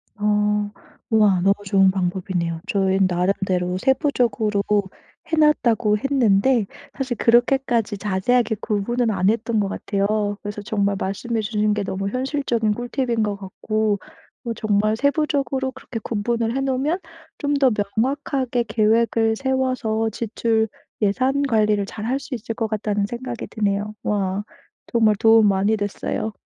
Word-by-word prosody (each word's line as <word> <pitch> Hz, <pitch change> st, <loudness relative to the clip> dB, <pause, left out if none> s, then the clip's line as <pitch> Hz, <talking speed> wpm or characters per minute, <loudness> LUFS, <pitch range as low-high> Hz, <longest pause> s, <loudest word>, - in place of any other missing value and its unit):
어. 210 Hz, 0 st, +1 dB, 0.4 s
우와. 210 Hz, -4 st, +4 dB
너무 195 Hz, +2 st, +4 dB
좋은 195 Hz, -1 st, +4 dB
방법이네요. 180 Hz, -2 st, -2 dB
저희는 195 Hz, -1 st, +2 dB
나름대로 180 Hz, 0 st, 0 dB
세부적으로 240 Hz, -, +1 dB, 0.7 s
해 320 Hz, -, +3 dB
놨다고 235 Hz, -8 st, +3 dB
했는데 240 Hz, -2 st, +2 dB, 0.3 s
사실 260 Hz, -3 st, -2 dB
그렇게까지 240 Hz, -2 st, +2 dB
자세하게 215 Hz, +4 st, +1 dB
구분은 230 Hz, +3 st, 0 dB
안 190 Hz, -1 st, +2 dB
했던 225 Hz, 0 st, 0 dB
것 200 Hz, -, 0 dB
같아요. 205 Hz, +1 st, -1 dB
그래서 205 Hz, 0 st, -6 dB
정말 200 Hz, -2 st, 0 dB
말씀해 225 Hz, +4 st, -2 dB
주신 210 Hz, -1 st, 0 dB
게 210 Hz, -, -1 dB
너무 195 Hz, +1 st, -3 dB
현실적인 255 Hz, -3 st, 0 dB
꿀팁인 240 Hz, -1 st, -1 dB
것 205 Hz, -1 st, -1 dB
같고 205 Hz, +1 st, -2 dB, 0.5 s
어 235 Hz, -, -2 dB
정말 215 Hz, 0 st, +1 dB
세부적으로 280 Hz, -2 st, 0 dB
그렇게 255 Hz, -3 st, -7 dB
구분을 230 Hz, +2 st, -1 dB
해 270 Hz, -, 0 dB
놓으면 270 Hz, +7 st, 0 dB, 0.4 s
'좀 285 Hz, 0 st, -1 dB
더 275 Hz, -3 st, +4 dB, 0.2 s
명확하게 260 Hz, 0 st, 0 dB
계획을 225 Hz, +1 st, +2 dB
세워서 255 Hz, -4 st, 0 dB
지출, 225 Hz, 0 st, 0 dB, 0.3 s
예산 255 Hz, +7 st, +1 dB
관리를 215 Hz, -5 st, +2 dB
잘할 225 Hz, +6 st, -3 dB
수 280 Hz, 0 st, -8 dB
있을 225 Hz, 0 st, -5 dB
것 225 Hz, -1 st, -1 dB
같다.'는 210 Hz, -1 st, -1 dB
생각이 240 Hz, +2 st, -6 dB
드네요. 205 Hz, -1 st, -1 dB
와. 200 Hz, -1 st, -1 dB, 0.5 s
정말 220 Hz, -2 st, +3 dB
도움 225 Hz, 0 st, +6 dB
많이 200 Hz, +3 st, +2 dB
됐어요. 205 Hz, +1 st, -3 dB
220 Hz, 310 characters per minute, -22 LUFS, 205-245 Hz, 0.7 s, 도움